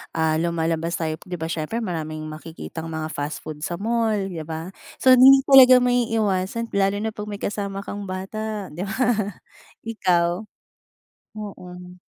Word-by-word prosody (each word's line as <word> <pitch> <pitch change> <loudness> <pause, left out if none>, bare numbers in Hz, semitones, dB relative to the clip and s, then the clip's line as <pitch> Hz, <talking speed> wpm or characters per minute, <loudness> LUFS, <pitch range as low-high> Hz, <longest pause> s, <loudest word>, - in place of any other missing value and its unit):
ah, 160 -1 +1
lumalabas 165 0 -1
tayo, 160 -2 -2
'di 180 - -4
ba 165 0 -4
siyempre, 170 +10 -3
maraming 155 -4 -4
makikitang 160 +1 -8
mga 160 -1 -4
fast 145 +1 -3
food 155 -1 -7
sa 170 +3 -1
mall, 225 +3 0
di 195 -5 -3
ba, 165 +3 -5 0.2
so, 260 - +4
hindi 265 +2 +8
talaga 265 -2 +8
maiiwasan 225 -3 0
lalo 200 +1 +1
na 220 - -1
pag 210 -1 -7
may 205 -1 -6
kasama 200 -1 -3
kang 205 0 -6
bata, 200 +2 -5
di 175 +6 -5
ba? 220 - -3 0.9
Ikaw? 180 -3 0 0.9
Mm. 180 -3 -9
185 Hz, 150 wpm, -23 LUFS, 165-215 Hz, 0.9 s, hindi